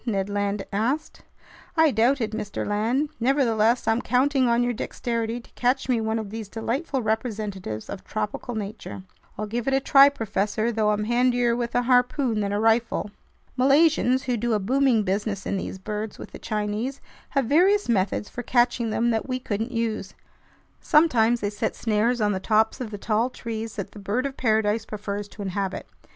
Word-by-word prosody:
Ned 200 -4 -1
Land 205 0 -1
asked. 255 +10 -1 0.6
"I 320 -2 +5
doubt 245 +4 +2
it, 215 -1 -1
Mr. 210 -2 -4
Land. 230 +8 0
Nevertheless, 240 -3 +2
I'm 225 +2 +2
counting 260 +1 +2
on 235 +1 +3
your 245 0 0
dexterity 230 0 -3
to 235 - -18
catch 255 +2 0
me 245 -3 +1
one 220 0 -1
of 215 -3 -5
these 220 -2 -6
delightful 255 +5 -2
representatives 210 - -3
of 200 - -7
tropical 215 +3 -4
nature!" 205 -2 -6 0.3
"I'll 215 - -2
give 230 +3 -4
it 270 - +3
a - - +3
try, 275 +1 +7
professor, 220 -3 -1
though 215 -2 +1
I'm 210 0 +1
handier 240 +1 +2
with 235 -1 -3
a 245 - +3
harpoon 250 -1 +2
than 200 -1 -1
a 205 - 0
rifle." 225 -1 +1 0.5
Malaysians, 275 -1 +4
who 250 -2 -1
do 235 +1 0
a 210 - +2
booming 250 +2 +2
business 200 +1 -2
in - - -1
these 190 - -5
birds 210 +2 -5
with - - -10
the - - -10
Chinese, 215 +5 -3 0.4
have 270 - +3
various 375 - +3
methods 205 -2 0
for 245 - -6
catching 240 -1 +1
them 235 +2 +1
that 225 +3 -2
we 255 - 0
couldn't 225 -1 -3
use. 225 -5 -3 0.6
Sometimes 240 -8 +3
they 205 0 -1
set 205 - -2
snares 230 +2 +1
on 210 -1 +2
the 190 - -1
tops 220 +4 +1
of 240 - -4
the 205 - -6
tall 220 +4 0
trees 225 -3 -6
that 200 - -5
the 210 - -11
bird 210 +7 -1
of 275 -1 -3
paradise 220 -3 +1
prefers 205 -1 -5
to 205 0 -9
inhabit. 195 0 -3
225 Hz, 185 wpm, -25 LUFS, 210-250 Hz, 0.6 s, try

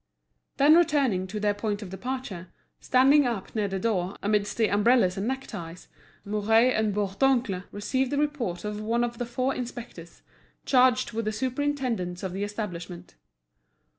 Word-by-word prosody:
Then 285 +2 +6
returning 275 - +2
to 210 +3 -5
their 205 0 +1
point 205 0 -3
of 185 - -9
departure, 195 -3 -5 0.3
standing 270 +2 +4
up 225 -6 -4
near 210 -2 0
the 195 0 -3
door, 190 -2 -1
amidst 205 0 0
the 225 -2 +3
umbrellas 205 -2 +3
and 195 +3 -3
neckties, 200 -10 -6 0.4
Mouret 220 +4 +3
and 220 -1 +1
Bourdoncle 200 0 0
received 260 +6 -1
the 285 - 0
report 275 - -2
of 210 0 -4
one 230 +2 0
of 240 -1 -3
the 245 - -3
four 255 +3 -1
inspectors, 235 -8 -8 0.4
charged 255 -1 +3
with 230 -1 -3
the 215 - 0
superintendence 255 -7 -2
of 185 -2 -3
the 195 +2 -3
establishment. 180 -4 -6
215 Hz, 155 wpm, -27 LUFS, 195-255 Hz, 0.4 s, Then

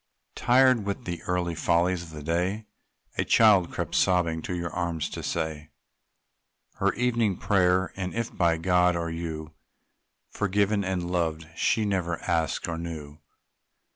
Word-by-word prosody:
Tired 130 -2 +4
with 100 0 -4
the 85 -2 -4
little 90 -1 0
follies 85 +2 +1
of 85 - -10
the 75 -2 -9
day, 90 +7 -1 0.5
A - - +4
child 105 -6 +5
crept, - - -4
sobbing, 85 -3 +2
to 90 - -4
your 85 -1 -3
arms 85 -3 -2
to - - -5
say 80 -2 -3 1.1
Her - - +2
evening 120 -5 +1
prayer; 95 -2 +2
and 95 -1 -3
if 115 0 -3
by 85 -3 +2
God 90 +1 +3
or 85 -1 -2
you 80 -2 -5 0.8
Forgiven 105 +1 +1
and 90 -2 -2
loved, 80 -3 -1
she 110 - +1
never 90 -4 -1
asked 80 -2 0
or 80 -1 -3
knew. 80 -3 -7
90 Hz, 145 wpm, -27 LUFS, 85-95 Hz, 1.1 s, child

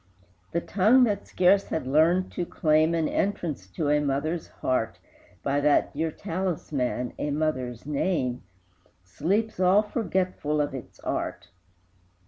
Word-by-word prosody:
The 170 - 0
tongue 215 +9 +4
that 210 -4 0
scarce 190 +2 +3
had 160 -5 -3
learned 165 +7 +3
to 180 - -2
claim 155 0 +2
An 160 -2 +1
entrance 165 - -2
to 145 - -2
a 150 0 +4
mother's 150 +4 -1
heart 130 -3 -2 0.5
By 140 +1 +1
that 145 0 +3
dear 160 +3 -1
talisman, 155 -8 -2
a 150 - -1
mother's 135 -6 -2
name, 140 -4 -1 0.6
Sleeps 185 - -1
all 190 +3 +5
forgetful 185 -8 -1
of 145 -2 0
its 130 -3 -9
art! - - -3
155 Hz, 130 wpm, -26 LUFS, 140-185 Hz, 0.6 s, all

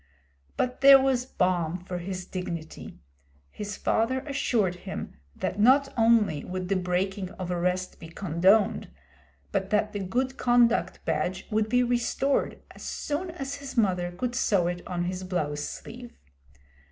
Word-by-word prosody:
But 250 +1 -1
there 275 0 +10
was 260 -2 +1
balm 180 -6 0
for 180 -1 -4
his 185 0 -5
dignity. 170 -4 -6 0.5
His 205 -1 -6
father 260 +4 +1
assured 230 - 0
him 190 +1 -6 0.2
that 200 - -3
not 275 +5 +5
only 225 - +3
would 185 0 -5
the 195 - +2
breaking 185 +1 -1
of 180 -1 -5
arrest 180 +1 -1
be 165 - -9
condoned, 190 +4 +2 0.6
but 195 - -1
that 210 0 +1
the 205 - -3
good 255 +8 -1
conduct 240 -1 +2
badge 165 +4 -1
would 215 0 +1
be 250 +2 +3
restored 245 +3 0
as - - -14
soon 310 +5 -3
as 280 -5 -5
his 275 -2 -9
mother 180 -5 +2
could 240 +7 -3
sew 200 -7 +2
it 175 0 -2
on 175 -1 -2
his 180 +1 -3
blouse 155 -6 -2
sleeve. 240 +7 -8
195 Hz, 150 wpm, -27 LUFS, 180-245 Hz, 0.6 s, there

